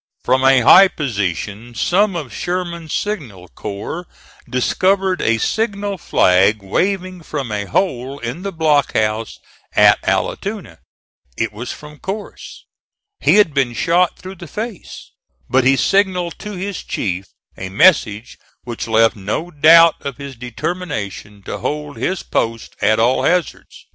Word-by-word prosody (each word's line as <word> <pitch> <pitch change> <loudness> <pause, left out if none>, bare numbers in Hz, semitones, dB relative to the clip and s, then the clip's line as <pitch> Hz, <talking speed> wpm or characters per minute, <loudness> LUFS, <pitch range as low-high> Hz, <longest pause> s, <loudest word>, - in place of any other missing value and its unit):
From 130 0 +2
a 135 -1 +5
high 190 +11 +8
position 110 - -4
some 195 - +2
of 150 -7 -5
Sherman's 175 -3 -4
signal 125 - -4
corps 105 - -6 0.4
discovered 185 +8 +1
a 115 0 +2
signal 205 - -2
flag 100 - +3
waving 185 - -1
from 140 -7 -5
a 105 -1 -2
hole 130 - -1
in 125 +6 -5
the 200 +1 -4
block 155 -4 +1
house 110 +1 -1 0.4
at - - +5
Allatoona. - - -3 0.6
It 110 -2 -2
was 115 +4 -6
from 150 0 -11
Corse. 200 +2 -7 0.5
He - - +3
had 205 -8 +4
been 135 -4 +1
shot 170 +7 +1
through 190 +1 -10
the 175 - -8
face, 215 +4 -7 0.4
but 130 0 +2
he 135 +1 +5
signalled 185 +1 +1
to 210 0 -7
his 195 0 -5
chief 95 -1 -3 0.3
a 95 - -6
message 110 - +2 0.2
which 120 -2 -6
left 115 +1 +3
no 105 - -4
doubt 165 +2 +6
of 140 -3 -5
his 140 -1 -8
determination 115 - -5
to - - -6
hold 150 -1 -4
his 185 -1 -2
post 115 0 -2
at 110 0 +3
all 120 +3 +3
hazards. 180 -2 -2
145 Hz, 140 wpm, -18 LUFS, 115-180 Hz, 0.6 s, high